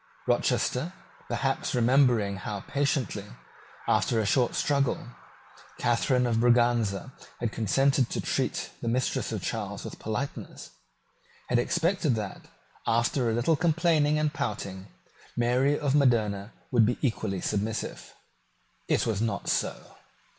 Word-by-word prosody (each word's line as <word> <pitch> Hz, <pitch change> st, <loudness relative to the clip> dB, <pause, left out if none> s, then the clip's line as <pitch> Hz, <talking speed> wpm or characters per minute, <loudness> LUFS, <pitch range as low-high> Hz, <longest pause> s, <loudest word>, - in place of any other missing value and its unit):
Rochester, 150 Hz, +9 st, +1 dB, 0.3 s
perhaps 130 Hz, +3 st, -1 dB
remembering 120 Hz, -5 st, +3 dB
how 100 Hz, +1 st, -5 dB
patiently, 140 Hz, -, -1 dB, 0.6 s
after 115 Hz, -, +2 dB
a 110 Hz, -, +1 dB
short 120 Hz, +4 st, +2 dB
struggle, 140 Hz, -4 st, 0 dB, 0.7 s
Catharine 125 Hz, +2 st, +2 dB
of 115 Hz, -2 st, +1 dB
Braganza 120 Hz, -1 st, +2 dB, 0.3 s
had 120 Hz, -2 st, -1 dB
consented 130 Hz, +4 st, +2 dB
to -, -, -3 dB
treat -, -, -1 dB
the -, -, -4 dB
mistresses 125 Hz, +2 st, 0 dB
of -, -, -4 dB
Charles -, -, -4 dB
with -, -, -8 dB
politeness, 110 Hz, +6 st, -5 dB, 0.8 s
had 120 Hz, -, +3 dB
expected 165 Hz, 0 st, +1 dB
that, 105 Hz, -3 st, -5 dB, 0.4 s
after 120 Hz, +2 st, +2 dB
a 110 Hz, -, 0 dB
little 125 Hz, +8 st, +2 dB
complaining 160 Hz, -2 st, +2 dB
and 150 Hz, 0 st, 0 dB
pouting, 100 Hz, -8 st, -4 dB, 0.5 s
Mary 125 Hz, +4 st, +2 dB
of 145 Hz, -3 st, 0 dB
Modena 110 Hz, -7 st, +2 dB, 0.2 s
would 120 Hz, -3 st, +5 dB
be 125 Hz, -, 0 dB
equally 110 Hz, -7 st, -1 dB
submissive. 105 Hz, +4 st, -3 dB, 0.8 s
It -, -, +2 dB
was 110 Hz, -3 st, -1 dB
not 105 Hz, -5 st, -1 dB
so. -, -, -2 dB
120 Hz, 125 wpm, -28 LUFS, 110-140 Hz, 0.8 s, would